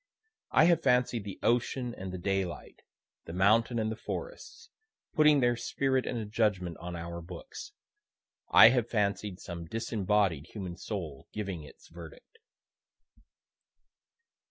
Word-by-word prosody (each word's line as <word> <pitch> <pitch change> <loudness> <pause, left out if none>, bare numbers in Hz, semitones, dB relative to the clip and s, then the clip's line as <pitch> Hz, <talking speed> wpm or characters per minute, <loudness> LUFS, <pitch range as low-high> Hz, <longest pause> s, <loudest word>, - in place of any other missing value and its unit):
I - - +5
have 170 0 +4
fancied 125 -5 +2
the 100 - -6
ocean 120 +1 0
and 95 -3 -7
the 95 - -5
daylight, 95 -1 -3 0.4
the 85 - -8
mountain 110 +6 +3
and 110 -1 0
the - - -3
forest, 485 - -7 0.4
putting 150 -2 +5
their 120 -1 +3
spirit 130 +2 -1
in 120 - -2
a 110 - -3
judgment 105 -5 0
on 90 +1 -6
our 85 0 -6
books. 90 - -9 0.8
I - - +9
have 120 -2 +1
fancied 100 -3 -1
some 85 -2 -7
disembodied 105 - 0
human 95 -5 -6
soul 85 -9 -6
giving 100 -6 -4
its 75 - -15
verdict.) 85 - -13
105 Hz, 130 wpm, -30 LUFS, 90-120 Hz, 0.8 s, I